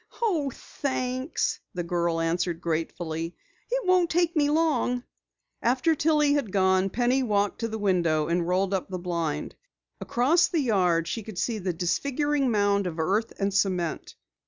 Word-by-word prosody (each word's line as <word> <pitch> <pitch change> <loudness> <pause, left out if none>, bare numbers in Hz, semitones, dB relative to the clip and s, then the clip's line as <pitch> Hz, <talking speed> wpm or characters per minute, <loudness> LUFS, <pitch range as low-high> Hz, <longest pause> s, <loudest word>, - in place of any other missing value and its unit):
"Oh, 345 -12 +1
thanks," 255 +1 -2 0.2
the 175 - -2
girl 170 -1 0
answered 165 +1 -1
gratefully. 165 0 -3 0.3
"It - - -1
won't 365 -2 +3
take 345 +1 +1
me 290 -2 +3
long." 295 -6 +1 0.6
After 255 +7 +2
Tillie 300 -1 +3
had 280 -9 -1
gone, 190 0 +3
Penny 245 +5 +1
walked 205 -4 0
to 230 - -1
the 220 0 -4
window 170 -7 +1
and 170 0 0
rolled 185 +2 +1
up 190 -1 -2
the 185 - -3
blind. 170 -4 -3 0.5
Across 320 +9 +3
the 340 - -1
yard 180 - +2
she 225 - -3
could 215 -3 -9
see 225 +3 -1
the 185 -1 -1
disfiguring 275 - 0
mound 200 -3 +2
of 170 -2 -5
earth 200 +8 0
and 195 0 -1
cement. 185 -4 -1
205 Hz, 160 wpm, -26 LUFS, 175-280 Hz, 0.6 s, won't